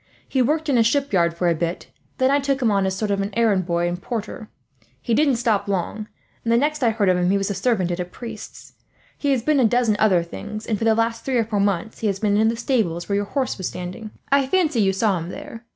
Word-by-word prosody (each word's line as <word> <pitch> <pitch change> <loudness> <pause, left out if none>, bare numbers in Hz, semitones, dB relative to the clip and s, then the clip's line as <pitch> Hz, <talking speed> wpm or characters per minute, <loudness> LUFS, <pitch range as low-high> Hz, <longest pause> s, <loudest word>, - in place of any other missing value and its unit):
He 265 - +1
worked 305 +5 +1
in 265 -5 +3
a - - +5
shipyard 210 -10 +1
for 175 - +1
a 170 - +4
bit, 170 +2 -3 0.3
then 260 +1 +3
I 285 - +3
took 275 -1 0
him 235 -5 +2
as 195 -1 +2
a 190 - -4
sort 210 0 -1
of 200 0 0
errand 205 -6 +2
boy 170 0 +1
and 175 +1 -4
porter. 225 -2 -5 0.5
He 235 - -2
didn't 280 +1 +3
stop 225 -4 0
long, 200 +2 -2 0.4
and 230 - 0
the 235 - +5
next 300 +3 0
I 235 - +5
heard 215 -3 0
of 185 -1 +4
him 180 0 +1
he 200 - +3
was 195 0 -1
servant 195 -2 0
at 175 - -3
a 180 - -1
priest's. 225 +4 -10 0.4
He 285 - -2
has 260 -4 +1
been 300 +1 +2
a - - +4
dozen 235 -1 +2
other 190 -6 +4
things, 170 - -7
and 215 -3 -1
for 225 - -1
the 220 -1 +4
last 230 0 -1
three 265 -2 0
or 230 - +2
four 210 -2 -1
months 200 +2 -1
he 220 - -1
has 195 -2 0
been 205 -1 +1
in 220 +1 +3
the 230 +1 0
stables 210 -9 -1
where 200 - 0
your 205 0 0
horse 260 0 -2
was 185 - -2
standing. 185 +5 -6 0.2
I 275 -1 +3
fancy 315 -7 +2
you 195 -1 +3
saw 195 -1 +1
him 165 +1 -6
there. 245 0 -9
220 Hz, 265 wpm, -22 LUFS, 190-245 Hz, 0.5 s, a